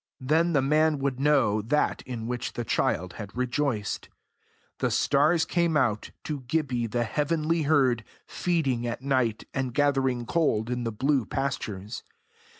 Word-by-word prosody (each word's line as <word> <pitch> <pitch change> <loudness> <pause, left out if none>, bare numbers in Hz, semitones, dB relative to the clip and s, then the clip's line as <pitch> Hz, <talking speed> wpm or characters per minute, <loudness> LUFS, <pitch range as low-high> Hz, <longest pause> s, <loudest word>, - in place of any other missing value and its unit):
Then 160 +6 +2
the 140 -3 +3
man 155 +2 +3
would 135 -2 -2
know 135 -8 +3
that 150 +8 0
in 120 -3 -5
which 125 +1 -3
the 120 - -3
child 90 -4 0
had 100 +2 -9
rejoiced. 125 -4 -1 0.7
The - - +1
stars 160 +4 +3
came 170 -2 +1
out, 115 -7 +1
to 150 -2 -3
Gibbie 125 -5 0
the 120 +2 0
heavenly 155 +5 0
herd, 130 -7 +3 0.2
feeding 140 -9 -1
at 120 +2 -4
night, 130 -5 +1
and 130 -3 -2
gathering 135 -4 +1
gold 120 -6 +1
in 125 -1 -2
the 115 - -1
blue 130 +2 +1
pastures. 115 -6 -3
130 Hz, 150 wpm, -27 LUFS, 120-150 Hz, 0.7 s, the